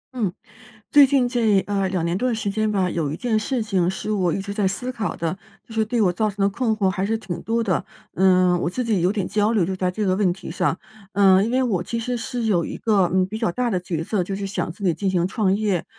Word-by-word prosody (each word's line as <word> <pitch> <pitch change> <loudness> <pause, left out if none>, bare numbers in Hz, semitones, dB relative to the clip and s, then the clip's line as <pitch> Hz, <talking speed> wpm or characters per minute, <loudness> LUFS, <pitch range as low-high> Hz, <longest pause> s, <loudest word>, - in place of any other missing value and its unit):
嗯， 215 -7 0 0.6
最 290 -3 +8
近 265 -2 +2
这 230 -5 +2
呃， 195 -1 -1
2 180 -3 -1
年 170 +1 0
多 255 - +1
的 235 - 0
时 210 -2 -2
间 215 +1 0
吧， 190 -3 +1
有 165 -5 -2
一 155 - -4
件 230 -3 0
事 240 +2 -1
情 190 -5 +1
是 190 +3 -4
我 185 -5 +1
一 195 - -1
直 200 +1 -5
在 200 -2 +1
思 220 +7 -3
考 225 -4 -3
的， 170 +3 -3 0.3
就 225 - -11
是 220 -1 +2
对 235 +2 -1
我 180 -3 +2
造 215 +4 0
成 200 -1 -2
的 - - +3
困 220 +2 0
惑 200 -2 +2
还 190 0 -1
是 220 +3 0
挺 175 -6 -6
多 230 +1 0
的。 190 -6 0 0.3
嗯， 185 -1 +4
我 - - 0
自 250 +8 -3
己 220 -6 +1
有 180 +2 +3
点 200 -3 -2
焦 210 +2 +1
虑 200 -6 +2
就 190 +2 -3
在 185 -1 0
这 210 +3 -2
个 185 -1 +2
问 195 -2 +2
题 185 -1 -7
上， 165 - 0 0.4
嗯， 195 -1 +5
因 220 - -1
为 260 +2 +2
我 205 -8 0
其 230 +6 -3
实 245 +2 -2
是 245 0 -4
有 195 -6 +2
一 - - -5
个， 200 -6 +2
嗯， 185 0 +3
比 215 +4 -6
较 225 -7 0
大 245 +5 -1
的 185 - 0
角 170 -3 -3
色， 190 +1 -1
就 195 +2 -4
是 200 0 -4
想 185 -4 -3
自 200 +5 -12
己 180 -3 +3
进 195 +5 -1
行 180 -2 +1
创 195 -2 +1
业。 200 -5 0
200 Hz, 295 characters per minute, -22 LUFS, 185-220 Hz, 0.6 s, 最